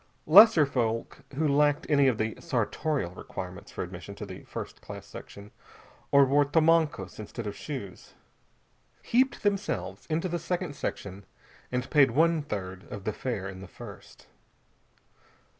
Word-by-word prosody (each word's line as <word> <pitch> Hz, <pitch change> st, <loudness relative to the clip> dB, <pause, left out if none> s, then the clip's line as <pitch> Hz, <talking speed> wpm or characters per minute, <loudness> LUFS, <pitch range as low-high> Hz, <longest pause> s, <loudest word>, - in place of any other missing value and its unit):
Lesser 185 Hz, -1 st, +8 dB
folk 115 Hz, -4 st, -2 dB, 0.2 s
who 155 Hz, +2 st, +1 dB
lacked 145 Hz, +1 st, +3 dB
any 140 Hz, -2 st, +4 dB
of 125 Hz, -4 st, +2 dB
the 110 Hz, 0 st, -1 dB
sartorial 135 Hz, -, -1 dB
requirements 95 Hz, +1 st, -8 dB
for -, -, -4 dB
admission -, -, -8 dB
to -, -, -7 dB
the -, -, -9 dB
first -, -, -7 dB
class -, -, -9 dB
section, 100 Hz, +1 st, -11 dB, 0.6 s
or 140 Hz, 0 st, +7 dB
wore 140 Hz, +2 st, +4 dB
tomancos 155 Hz, -, +2 dB
instead 110 Hz, +2 st, -6 dB
of 100 Hz, -1 st, -4 dB
shoes, 125 Hz, -11 st, -8 dB, 0.9 s
heaped 260 Hz, +3 st, +2 dB
themselves 205 Hz, 0 st, -2 dB
into 165 Hz, +3 st, 0 dB
the 175 Hz, -1 st, -2 dB
second 175 Hz, -2 st, -3 dB
section 100 Hz, -5 st, -5 dB, 0.5 s
and 125 Hz, 0 st, -1 dB
paid 145 Hz, -4 st, +6 dB
one 160 Hz, +5 st, +3 dB
third 95 Hz, -8 st, -6 dB
of 100 Hz, -, -6 dB
the 110 Hz, -, -2 dB
fare 110 Hz, -7 st, -3 dB
in 95 Hz, -1 st, -8 dB
the 95 Hz, -, -9 dB
first. -, -, -12 dB
140 Hz, 145 wpm, -28 LUFS, 105-160 Hz, 0.9 s, Lesser